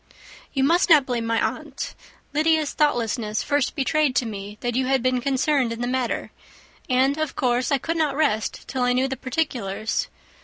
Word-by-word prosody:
"You 270 - 0
must 340 +6 +3
not 300 -5 +7
blame 240 -3 -2
my 230 0 +1
aunt. - - -3 0.4
Lydia's 310 0 +2
thoughtlessness 230 -7 0
first 290 0 0
betrayed 295 -1 +1
to 250 - +2
me 205 -1 -6
that 240 0 -1
you 255 0 +1
had 265 -2 +2
been 255 -1 +1
concerned 270 -1 +1
in 230 +1 -5
the 245 - -1
matter; 255 -1 -2 0.6
and, 265 +3 +2
of 310 -2 -2
course, 250 +2 +1
I 280 - +4
could 330 +5 -3
not 300 -4 +1
rest 220 -8 0
till 260 - -3
I 245 0 +3
knew 255 +2 +2
the 265 - -3
particulars. 245 - -2
260 Hz, 185 wpm, -24 LUFS, 240-295 Hz, 0.6 s, not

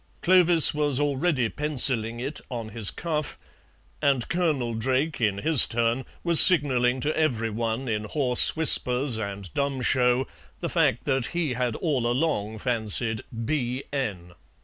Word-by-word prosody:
Clovis 175 -4 +5
was 145 -3 -1
already 145 -2 -1
pencilling 125 -5 +1
it 140 +5 -5
on 115 -4 -6
his 110 -2 0
cuff, 155 -3 -5 0.6
and 140 -5 0
Colonel 150 -9 -1
Drake, 130 +6 -2
in 105 -3 0
his 155 +5 +5
turn, 120 +2 -2 0.2
was 170 -2 +5
signalling 130 -7 +3
to 150 +4 -2
every 115 -8 -1
one 115 +3 -4
in 105 -2 -3
hoarse 125 +2 +2
whispers 125 -6 +2
and 100 -4 -7
dumb 140 -2 -3
show 125 +1 +1 0.3
the - - -4
fact 115 - 0
that 135 -3 -1
he 160 -7 -1
had 125 -2 -3
all 135 -8 -2
along 120 -5 -2
fancied 110 -1 0 0.2
"B.N." 125 - -4
125 Hz, 140 wpm, -24 LUFS, 115-150 Hz, 0.6 s, Clovis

